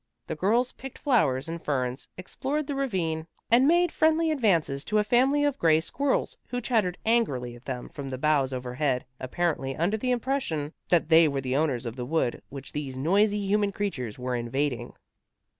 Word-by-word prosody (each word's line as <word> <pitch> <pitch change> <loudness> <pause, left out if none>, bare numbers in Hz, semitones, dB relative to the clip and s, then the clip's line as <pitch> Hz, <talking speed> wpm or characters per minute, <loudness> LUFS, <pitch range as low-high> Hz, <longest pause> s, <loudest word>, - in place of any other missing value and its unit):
The - - -4
girls 230 +10 +1
picked 270 -1 -10
flowers 160 - +2
and 165 0 -6
ferns, 130 -3 -2
explored 275 +11 -3
the 285 - -3
ravine 175 -12 -2 0.2
and 250 +4 +6
made 345 +1 +4
friendly 320 +1 +2
advances 170 - +1
to 215 - 0
a 210 - +4
family 260 +7 +3
of 290 -2 0
gray 160 -2 +4
squirrels 275 - -1
who 245 - -3
chattered 215 -7 0
angrily 140 - +1
at 120 - -16
them 125 -2 -5
from 140 -1 -7
the 130 - -4
boughs 140 -1 +2
overhead, 125 +1 -1
apparently 135 -1 -1
under 180 +9 0
the 250 +4 -2
impression 240 - -1 0.2
that 170 -3 +3
they 165 0 +7
were 140 -2 -1
the 130 0 -2
owners 140 -5 0
of 115 +2 -5
the 125 - -4
wood 155 -5 0
which 135 -1 -8
these 140 -3 -5
noisy 200 +8 +2
human 205 0 +2
creatures 140 - -3
were 125 0 -2
invading. 125 +2 -2
165 Hz, 180 wpm, -27 LUFS, -, 0.2 s, they